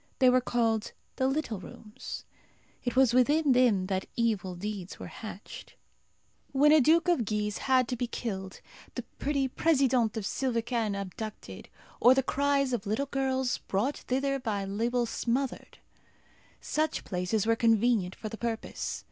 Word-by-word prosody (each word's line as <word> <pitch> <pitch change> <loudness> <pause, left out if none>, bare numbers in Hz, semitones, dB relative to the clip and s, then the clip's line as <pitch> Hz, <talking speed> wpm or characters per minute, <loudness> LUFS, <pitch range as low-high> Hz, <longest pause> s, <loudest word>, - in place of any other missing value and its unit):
They 255 -2 +5
were 255 0 +4
called 225 -3 0 0.2
"The 260 - +2
Little 270 -7 -1
Rooms." 210 +3 -9 0.6
It 245 -1 -2
was 260 -3 +5
within 285 +4 +4
them 240 -7 +4
that 190 0 -2
evil 210 -6 0
deeds 195 0 -5
were - - -8
hatched. 215 -2 -9 0.8
When 290 +2 +5
a 310 -1 +7
Duke 325 +6 +4
of 345 -9 +3
Guise 210 0 -2
had 255 -2 +4
to 250 - -1
be 245 0 -2
killed, 190 -6 -5 0.3
the - - -3 0.2
pretty 280 -2 0
Présidente 260 -6 +2
of 215 - -3
Sylvecane 230 -3 -1
abducted, 205 +3 -7 0.3
or 250 +2 +7
the 270 - +2
cries 280 -1 +1
of 215 -4 -2
little 220 +7 0
girls 265 -2 -1
brought 230 +9 -1
thither 275 +2 -1
by 205 -5 -2
Lebel 235 +5 0
smothered, 245 +3 -2 0.8
such 310 +1 -1
places 180 +3 -1
were 230 0 +3
convenient 225 -4 +2
for 220 - -6
the 220 +1 -7
purpose. 230 -1 -3
240 Hz, 150 wpm, -29 LUFS, 210-265 Hz, 0.8 s, a